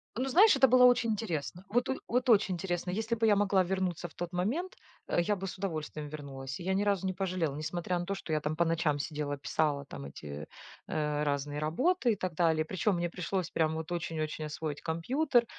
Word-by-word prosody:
Ну, 255 +4 -1
знаешь, 390 - +7
это 270 0 +6
было 250 0 +7
очень 245 -2 +4
интересно. 180 -5 -3
Вот 245 +3 +1
о 265 - +1
вот 250 +2 +1
очень 210 -4 +5
интересно. 175 0 -3
Если 220 +4 -2
бы 225 0 +2
я 210 - +6
могла 200 -2 +3
вернуться 180 -2 -1
в 160 - -19
тот 175 0 -4
момент, 250 - -1 0.3
э, - - +2
я 205 +4 +1
бы 195 0 -5
с 185 - -6
удовольствием 155 -5 -4
вернулась. 135 -3 -7
Я 185 +2 -1
ни 195 - +2
разу 200 -2 +1
не 190 - 0
пожалела, 180 -6 -1
несмотря 175 +4 -2
на 175 - -3
то, 195 - -2
что 165 -4 -5
я 155 - +2
там 150 +1 -2
по 170 - +2
ночам 165 -3 +1
сидела, 145 -1 -3
писала 145 0 0
там 70 - -8
эти, 70 +1 -8 0.4
э, 150 -1 -1
разные 145 0 -1
работы 240 - +2
и - - -2
так 185 -3 -3
далее. 160 -2 +2
Причём 190 +4 0
мне 175 0 -1
пришлось 180 0 -2
прям 160 -1 +1
вот 160 +1 -5
очень 165 -2 -3
очень 155 0 -3
освоить 150 -1 -4
компьютер, 240 - +1
175 Hz, 220 wpm, -31 LUFS, 155-205 Hz, 0.4 s, знаешь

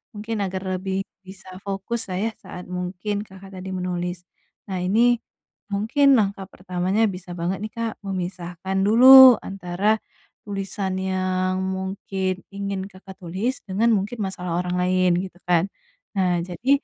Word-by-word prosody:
Mungkin 215 +2 -4
agar 190 0 -4 0.2
lebih 190 +1 -2 0.2
bisa 190 0 -12 0.2
fokuslah 195 0 -3
ya, 225 - 0
saat 180 - -8
mungkin 180 +3 -3
Kakak 190 +1 -13
tadi 190 +1 -7
menulis. 180 -1 -3 0.5
Nah 185 - -1
ini, 230 +6 +3 0.5
mungkin 225 +9 +1
langkah 195 -2 -1
pertamanya, 185 +3 -1
bisa 180 -1 -10
banget 180 +3 -1
nih, 215 - -5
Kak, 230 -1 -2 0.2
memisahkan 185 0 -4
dulu, 260 +3 +10
antara 195 +3 0 0.5
tulisan 195 -1 -3
yang 185 0 0 0.2
mungkin 190 0 -2 0.2
ingin 200 -1 -3
Kakak 190 0 -12
tulis, 190 +9 -3
dengan 205 +5 +2
mungkin 205 +5 -4
masalah 180 -2 -5
orang 180 0 -3
lain, 185 0 +3
gitu 185 -2 -9
kan. 175 -1 +3 0.5
Nah 180 -2 +2
jadi, 180 +8 -5
190 Hz, 135 wpm, -23 LUFS, 180-205 Hz, 0.5 s, dulu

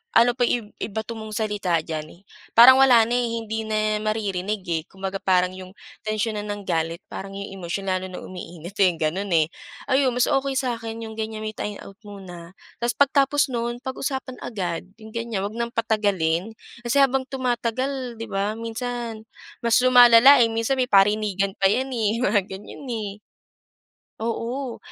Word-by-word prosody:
ano 235 +2 +6
pa - - -5
i 245 - +2 0.2
ibato 220 +2 -4
mong 220 -1 -7
salita 205 -6 0
diyan, 155 +2 -6 0.4
parang 260 +3 +10
wala 245 -4 +7
na 235 - -2
eh 245 - +1
hindi 220 0 -3
na 215 0 +1
maririnig 210 -2 -2
eh, 160 -2 0
kumbaga 195 0 -4
parang 180 -1 +2
'yong 185 0 -10 0.3
tensyon 215 0 -1
na 205 - -3
ng 205 0 -4
galit 165 +1 -1
parang 195 0 -7
yung 200 0 -6
emosyon 180 +3 -4
lalo 185 0 -1
na 180 - -7
umiinit 175 -1 -9
eh, 185 -3 +4
ganun 175 +6 -1
eh. 160 -2 +4 0.4
Ayun 265 -1 +3
mas 245 0 +3
okey 270 0 +1
sa'kin 230 -3 -3
yung 220 - -8
ganyan 220 0 -4
may 215 - -4
timeout 200 -1 -6
muna 180 -4 -10 0.3
tas 240 0 +1
pagtapos 280 0 +3
nun 240 0 -2
pag-usapan 265 -1 -4
agad 180 -6 -4 0.2
yung 220 - -10
ganyan, 230 -4 -3
wag 205 - -4
ng 235 0 -2
patagalin 205 -4 0 0.3
kasi 240 +3 +1
habang 270 -1 +2
tumatagal 255 0 -2
'di 230 - -5
ba 200 +2 -1
minsan 230 0 -5 0.4
mas 230 - +4
lumalala 250 +2 +8
eh, 230 - +5
minsan 230 +4 0
may 255 - +3
parinigan 200 -1 +3
pa 195 - +5
yan 260 +5 0
eh, 225 -3 0
mga 205 0 +3
ganyan 195 +8 -9
eh. 220 -4 -3 1.1
Oo. 235 +3 -3
220 Hz, 165 wpm, -23 LUFS, 195-240 Hz, 1.1 s, parang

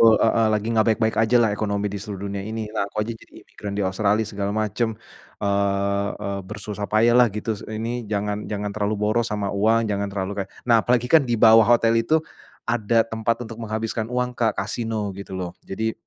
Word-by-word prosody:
Wa 115 -1 +7
heeh, 115 0 +3
"lagi 105 0 0
gak 110 -1 +3
baik-baik 110 0 +1
ajalah 115 0 +4
ekonomi 100 -1 -1
di 100 - -3
seluruh 100 -2 -6
dunia 100 0 -4
ini, 110 0 -4
lah 100 - 0
aku 100 - -18
aja 115 - -4
jadi - - -19
imigran 100 -1 -7
di 100 - 0
Australia, 100 +3 +1
segala 100 -1 -3
macem, 110 +1 -1 0.5
eee 100 0 +1
eee, 100 0 -3
bersusah 105 0 -5
payah 115 +2 +4
lah 125 - +7
gitu, 105 +2 -4 0.2
ini 115 +2 -4
jangan 105 0 -2
jangan 105 -1 -2
terlalu 105 0 0
boros 110 +2 +1
sama 105 -1 -1
uang, 110 +3 +2
jangan 100 0 -1
terlalu 95 0 -3
kayak." 95 - -24 0.2
Nah, 115 - +6
apalagi 125 0 +2
kan 160 -2 +7
di 120 - +2
bawah 110 0 +7
hotel 115 -1 +3
itu, 135 +8 +2 0.5
ada 115 -1 +2
tempat 110 +1 0
untuk 115 0 -9
menghabiskan 110 0 -3
uang, 125 0 -1
Kak, 110 -3 +1
Kasino 105 0 -2
gitu 100 -1 -9
loh, 90 -1 -4 0.2
jadi,, 110 +3 -1
110 Hz, 200 wpm, -23 LUFS, 100-115 Hz, 0.5 s, Wa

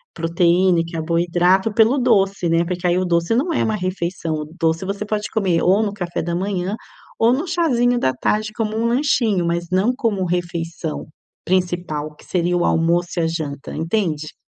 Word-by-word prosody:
proteína, 170 +1 +2
carboidrato 175 +4 +1
pelo 225 +5 +4
doce, 200 -7 +2
né. 165 +1 +2
Porque 180 +1 -2
aí 175 0 +2
o 185 - 0
doce 170 +4 +1
não 320 +8 +1
é - - +1
uma 220 - 0
refeição, 180 -3 -3
o 150 -1 -4
doce, 165 +2 +1
você 200 +2 -3
pode 210 0 -2
comer 185 -6 +1
ou 195 +4 +4
no 205 -2 -2
café 175 -4 -3
da 170 +1 -2
manhã, 190 +1 -2 0.4
ou 230 +1 +4
no 300 +8 -1
chazinho 255 -8 +2
da 130 - +2
tarde, 215 +7 -1
como 215 -1 -2
um 230 +1 +1
lanchinho, 235 - +1
mas 170 0 -1
não 195 +7 +2
como 215 -7 -1
refeição 170 -2 -3 0.4
principal, 175 -4 -1
que - - -18
seria 175 0 0
o 175 - +1
almoço 170 +2 +2
e - - +2
a - - +2
janta, 150 -4 -5
entende? 160 -3 -2
180 Hz, 180 wpm, -20 LUFS, 170-215 Hz, 0.4 s, pelo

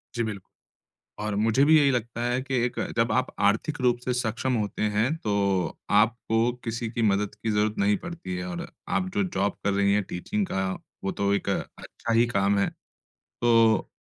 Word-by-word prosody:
जी 120 - 0
bill 110 -3 -4 0.8
और 105 0 -2
मुझे 115 +6 +3
भी 155 +2 +6
यही 145 -2 +4
लगता 120 -2 -2
है 120 +1 0
कि 135 0 -4
एक, 125 - -2 0.2
जब 115 0 +2
आप 130 0 +2
आर्थिक 105 +9 +1
रूप 125 -1 +3
से 125 - 0
सक्षम 125 +2 -1
होते 105 -3 -2
हैं, 105 +7 +1
तो 100 - 0
आपको 115 +2 +2
किसी 115 0 -3
की 115 0 -2
मदद 105 -1 +1
की 110 - -3
ज़रूरत 105 0 +1
नहीं 100 +1 +3
पड़ती 170 - -6
है 90 0 -4
और 90 -1 -5 0.2
आप 190 -2 0
जो 200 0 +2
जॉब 105 - 0
कर 100 - +2
रही 100 0 +2
हैं, 105 +1 +2
टीचिंग 195 - -3
का, 95 - -1 0.3
वो 95 - -1
तो 100 0 0
एक 100 - -2
अच्छा 115 - -4
ही 115 +1 +4
काम 100 -3 +1
है। 100 - +2 0.7
तो 115 -2 +4
110 Hz, 190 wpm, -26 LUFS, 100-125 Hz, 0.8 s, भी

